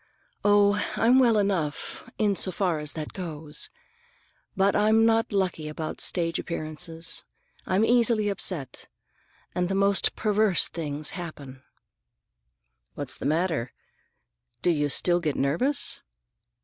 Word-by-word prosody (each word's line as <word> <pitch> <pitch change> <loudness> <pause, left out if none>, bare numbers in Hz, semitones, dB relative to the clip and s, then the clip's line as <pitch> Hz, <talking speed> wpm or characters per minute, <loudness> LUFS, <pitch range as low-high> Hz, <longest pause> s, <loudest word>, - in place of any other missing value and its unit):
"Oh, 205 0 +4
I'm 245 +3 +4
well 235 -4 +4
enough, 195 +1 -2
in 205 -2 +2
so 185 - +3
far 175 -3 0
as 150 -1 -5
that 155 -2 -6
goes. 155 -4 -6 0.9
But 195 +1 +3
I'm 220 +2 +4
not 225 0 +2
lucky 185 -6 -1
about 155 +1 -5
stage 165 -2 0
appearances. 165 0 -5 0.4
I'm 190 +4 +2
easily 230 -3 +3
upset, 180 -8 -5 0.7
and 180 0 -1
the 195 - -1
most 200 0 +2
perverse 210 -3 +2
things 150 -2 -4
happen." 145 -7 -8 1.3
"What's 145 -3 -3
the - - -3
matter? 155 -5 0 0.9
Do 175 - +4
you 145 -3 0
still 175 +4 +4
get 155 -4 -2
nervous?" 210 - +1
180 Hz, 125 wpm, -26 LUFS, 155-205 Hz, 1.3 s, Oh